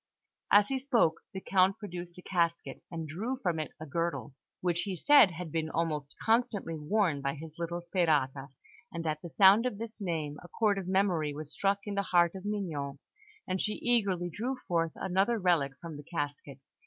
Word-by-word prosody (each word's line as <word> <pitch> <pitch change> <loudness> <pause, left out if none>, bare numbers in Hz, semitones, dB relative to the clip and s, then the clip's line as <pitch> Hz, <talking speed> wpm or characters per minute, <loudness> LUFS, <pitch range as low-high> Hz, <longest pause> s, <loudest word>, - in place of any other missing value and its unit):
As 205 0 +6
he 270 -1 0
spoke, 240 - +2
the 190 - -5
Count 190 0 +3
produced 175 -4 -7
a 180 - -11
casket, 170 -6 -1
and 165 -2 -5
drew 220 +12 -3
from 175 -10 -1
it 155 - -3
a 155 - -6
girdle, 165 -1 -2 0.3
which 175 -1 0
he 190 +1 -3
said 280 - +7
had 175 -2 -7
been 160 0 -1
almost 155 -4 -2
constantly 225 -6 +1
worn 160 -1 +1
by 140 +1 -1
his 160 +2 -10
little 170 +1 -3
Sperata; 150 -6 +1 0.4
and 165 -1 -5
at 155 -1 -1
the 170 - -7
sound 195 - +6
of 215 - -4
this 225 0 -7
name, 155 -6 -3
a - - -10
chord 205 +1 +1
of 185 - -6
memory 180 -6 +1
was 150 0 -6
struck 200 0 +1
in 205 - -4
the 200 - +1
heart 175 -3 +3
of 190 0 -8
Mignon, 160 -10 -3 0.5
and 185 0 -1
she 210 - 0
eagerly 195 -8 +1
drew 250 +8 -3
forth 165 -2 0
another 195 +5 +1
relic 170 -8 +2
from 165 -3 -8
the 145 - -9
casket. 145 -4 -5
175 Hz, 190 wpm, -30 LUFS, 155-200 Hz, 0.5 s, said